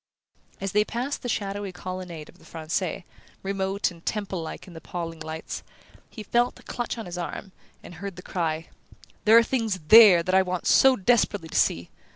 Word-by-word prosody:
As 195 0 -3
they 210 +2 +3
passed 245 +6 -4
the 245 - -4
shadowy 200 -2 -3
colonnade 180 -3 -7
of - - -18
the - - -19
Francais, 170 +3 -3 0.4
remote 195 0 -1
and 170 -1 -15
temple 200 -4 -3
like 160 - -7
in 180 - -13
the 160 - -10
paling 165 -2 -6
lights, 160 0 -6 0.5
he 215 - -9
felt 240 +4 +1
a - - -17
clutch 240 0 -4
on 225 - -6
his 175 0 -6
arm, 185 +3 -6 0.3
and - - -11
heard 195 +2 -7
the 180 - -11
cry: 165 -2 -3 0.6
"There 220 +2 +8
are 230 - +7
things 225 -5 -1
THERE 210 -6 +9
that 185 - -2
I 190 - +6
want 180 -2 -3
so 265 -1 +6
desperately 205 -5 +1
to - - -9
see!" 85 0 +1
190 Hz, 190 wpm, -25 LUFS, 170-210 Hz, 0.6 s, THERE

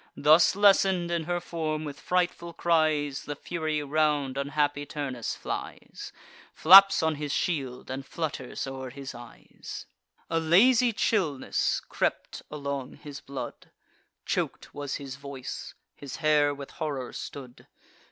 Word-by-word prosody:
Thus 155 +4 +5
lessen'd 195 -3 +4
in 170 -2 -1
her 175 +1 -1
form, 155 -3 -3
with 145 -2 -7
frightful 175 -1 -1
cries 155 -5 +1
The 145 - -4
Fury 155 -1 -3
round 145 -2 +1
unhappy 145 +1 0
Turnus 140 -5 -4
flies, - - -6 0.4
Flaps 195 +2 +8
on 160 -2 +1
his 145 -1 -4
shield, 135 -7 -2
and 135 +1 -4
flutters 140 -4 -4
o'er 135 -1 -6
his 135 +1 -8
eyes. 120 -1 -10 0.4
A 165 - 0
lazy 230 +10 +5
chillness 180 -11 0
crept - - -2
along 140 -3 -5
his 145 -1 -9
blood; 140 -1 -7 0.6
Chok'd - - -2
was 145 -1 -4
his 140 -1 -7
voice; 140 -2 -7 0.2
his 140 -2 -8
hair 150 -2 +3
with 140 -1 -8
horror 140 -5 -4
stood. 130 -3 -9
150 Hz, 130 wpm, -28 LUFS, 140-165 Hz, 0.6 s, Flaps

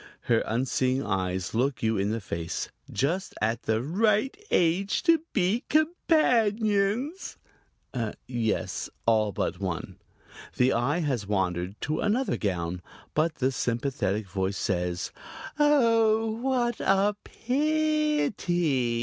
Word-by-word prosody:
Her 115 -1 +2
unseeing 130 +2 0
eyes 95 -2 -2
look 125 0 0
you 110 0 +2
in 100 0 0
the 115 +1 -1
face. 85 -4 -4 0.2
"Just 175 +8 -1
the 110 0 0
right 210 - +1
age 180 +4 +2
to 335 -3 +4
be 205 +5 +1
companions." 245 - +1 0.9
"Yes, 120 -3 -2 0.2
all 110 -2 +3
but 90 -1 -2
one." 90 -5 -4 0.6
The 125 +1 +3
eye 140 +9 +1
has 130 -10 -1
wandered 95 -1 -1
to 155 +2 -1
another 240 +6 +1
gown, 90 -3 -2 0.3
but 155 +1 +1
the 130 +1 +1
sympathetic 120 -4 -1
voice 95 +1 -2
says: 90 -4 -2 0.5
"Oh, 230 -6 +4
what 240 0 0
a 195 +2 +2
pi 305 +3 +1
i - - 0
ty!" - - -10
145 Hz, 115 wpm, -27 LUFS, -, 0.9 s, to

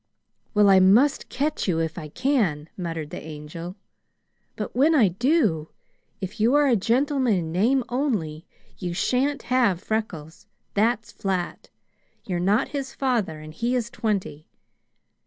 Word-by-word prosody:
"Well, 210 -1 +6
I 195 -1 +7
must 230 +10 +4
catch 290 0 -1
you 175 -4 +1
if 160 -1 -1
I 155 -4 -6
can," 180 - 0
muttered 165 -4 -5
the - - -6
Angel. 160 +3 -8 0.8
"But - - -5
when 300 +6 +4
I 225 -9 +5
do, 200 - +1 0.5
if 195 +4 -6
you 235 +6 +3
are 295 0 +5
a 260 -4 +4
gentleman 255 +2 +2
in 165 -3 -2
name 240 +10 +2
only, 205 - -2 0.3
you 175 -2 -3
shan't 265 +7 0
have 235 -9 +3
Freckles; 180 -7 -4 0.3
that's 220 +1 +1
flat. 185 -3 -3 0.6
You're 180 -3 -2
not 195 +5 +2
his 270 -2 -5
father 225 - -1
and 155 0 -10
he 235 +9 -1
is 235 -2 -2
twenty. 200 - -3
210 Hz, 145 wpm, -24 LUFS, 170-255 Hz, 0.8 s, I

